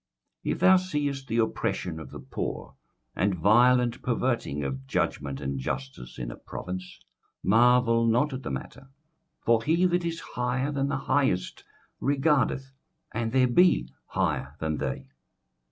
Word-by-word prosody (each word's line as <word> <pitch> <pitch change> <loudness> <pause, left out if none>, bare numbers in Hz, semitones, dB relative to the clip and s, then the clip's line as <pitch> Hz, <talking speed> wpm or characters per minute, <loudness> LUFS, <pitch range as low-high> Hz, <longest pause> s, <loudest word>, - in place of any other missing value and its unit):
21:005:008 - - +1
If - - -6
thou 190 0 +7
seest 145 -7 -2
the 115 - -1
oppression 95 -7 -1
of 80 -4 -9
the - - -9
poor, 65 +1 -5 0.4
and 95 0 +1
violent 120 +6 +4
perverting 115 - -1
of 65 0 -4
judgment 70 0 -1
and 70 0 -3
justice 65 -1 -5
in - - -4
a - - -8
province, 90 0 -7 0.4
marvel 115 +2 +4
not 125 +6 +2
at 130 - -4
the - - -5
matter: 130 - -7 0.5
for 115 -1 +3
he 165 +7 +2
that 175 -1 +2
is 165 -1 -2
higher 125 +3 -2
than 140 -1 0
the 140 +1 -1
highest 130 -11 0 0.4
regardeth; 135 -2 +1 0.4
and 115 0 -2
there 130 0 +4
be 125 - +3
higher 65 +3 -1
than 80 -1 -2
they. 65 - -3
120 Hz, 150 wpm, -27 LUFS, -, 0.5 s, thou